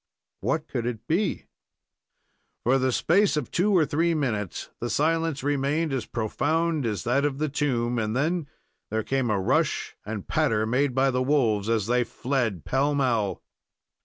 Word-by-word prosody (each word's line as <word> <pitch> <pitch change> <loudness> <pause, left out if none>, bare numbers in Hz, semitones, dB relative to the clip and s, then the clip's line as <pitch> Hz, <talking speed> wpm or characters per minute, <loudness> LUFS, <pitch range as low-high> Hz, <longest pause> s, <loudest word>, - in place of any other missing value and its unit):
What - - -1
could 120 0 -3
it 115 -3 -4
be? 185 +6 0 1.2
For 130 +3 +3
the 130 0 +1
space 180 - +3
of 150 - -3
two 195 +4 +2
or 160 - +4
three 165 +3 +1
minutes 110 - -2
the 120 - -3
silence 160 0 0
remained 145 +2 0
as 130 -5 -2
profound 155 +6 0
as 105 -3 -2
that 135 +4 +1
of 145 -2 0
the 155 +1 -1
tomb, 125 -5 0
and 110 0 -1
then 160 +3 0 0.4
there 110 +1 -1
came 135 -1 0
a 105 -2 +1
rush 95 - 0
and 105 -2 -6
patter, 110 -1 +1
made 125 +3 +1
by 135 0 +3
the 125 0 0
wolves 115 -7 +2
as 110 -3 +1
they 125 +2 +2
fled 120 - -2
pell 140 +2 +1
mell. 115 -9 0
130 Hz, 165 wpm, -26 LUFS, 115-150 Hz, 1.2 s, or